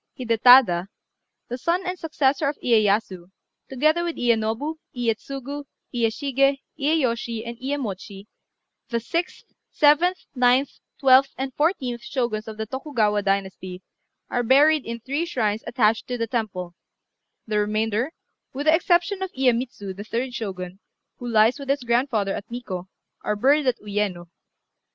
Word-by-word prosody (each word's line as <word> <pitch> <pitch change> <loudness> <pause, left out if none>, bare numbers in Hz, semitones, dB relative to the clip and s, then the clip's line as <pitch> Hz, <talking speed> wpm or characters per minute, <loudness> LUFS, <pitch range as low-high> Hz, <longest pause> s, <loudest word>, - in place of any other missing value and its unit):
Hidétada, 230 -6 +5 0.6
the 245 +2 -5
son 345 +6 0
and 365 0 -3
successor 290 -2 +1
of 290 - -5
Iyéyasu, 205 -5 +1 0.4
together 310 +6 +2
with 340 -1 -3
Iyénobu, 235 +6 0 0.2
Iyétsugu, 270 +4 -3 0.3
Iyéshigé, 275 +4 +1 0.2
Iyéyoshi, 240 -6 0
and 235 - -5
Iyémochi, 215 -8 -5 0.6
the 235 - 0
sixth, 335 +9 -4 0.2
seventh, 320 +5 +3
ninth, 250 +1 +2 0.2
twelfth, 270 0 +5
and 265 0 -4
fourteenth 270 -7 0
Shoguns 235 -5 -2
of 220 -1 -7
the 220 - -3
Tokugawa 220 -5 0
dynasty, 190 -2 -2 0.4
are 245 - -1
buried 285 +4 +4
in 235 0 -4
three 280 +7 -2
shrines 220 -8 -1
attached 225 -2 +1
to 250 - -3
the 230 - -1
temple; 200 -7 -3 0.7
the 215 -1 0
remainder, 215 +5 0 0.4
with 280 +3 -4
the 310 - +6
exception 350 +3 +2
of 380 -1 -3
Iyémitsu, 240 -6 -1
the 200 - -7
third 245 +4 -3
Shogun, 190 -5 -5 0.4
who 245 - -7
lies 225 +3 +3
with 275 -1 -8
his 275 -1 +1
grandfather 235 -4 +1
at - - -7
Nikkô, 195 -7 -6 0.4
are 210 - 0
buried 275 +6 +3
at 250 - +2
Uyéno. 200 -4 -3
245 Hz, 135 wpm, -24 LUFS, 215-280 Hz, 0.7 s, the